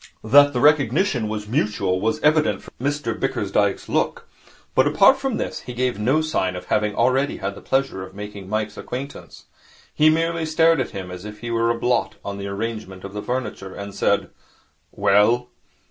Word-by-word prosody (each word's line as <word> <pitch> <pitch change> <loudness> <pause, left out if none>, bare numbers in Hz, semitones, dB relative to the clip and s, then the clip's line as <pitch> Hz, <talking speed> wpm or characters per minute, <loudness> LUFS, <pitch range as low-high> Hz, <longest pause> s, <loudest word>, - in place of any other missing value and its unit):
That 145 +6 +6
the 125 - -2
recognition 145 - +3
was 105 -1 -4
mutual 105 -6 0
was 110 +2 0
evident 155 +1 +2
from - - -14
Mr 145 -3 -1
Bickersdyke's - - 0
look. - - -1 0.5
But 130 - +4
apart 195 - +5
from 270 -4 -2
this, - - -3
he 125 - -9
gave 125 -3 -1
no 130 +9 +2
sign 95 -13 -1
of 90 0 -7
having 105 +1 0
already 135 +2 +1
had 100 +1 -3
the - - -12
pleasure 135 -7 -1
of 95 +1 -9
making 105 -2 -8
Mike's 110 0 -2
acquaintance. 135 +3 -7 0.5
He 155 +1 +5
merely 165 0 0
stared 160 0 +4
at - - -3
him 95 -2 -7
as 90 0 -8
if 105 0 -9
he 120 0 -4
were 115 0 +1
a 115 - +1
blot 120 +1 0
on 100 0 -5
the 100 - -5
arrangement 100 -2 -5
of 100 0 -8
the 105 - -4
furniture, 105 -6 -4
and 100 0 -7
said, - - 0 0.6
'Well?' 105 +5 +3
115 Hz, 185 wpm, -22 LUFS, 100-145 Hz, 0.6 s, That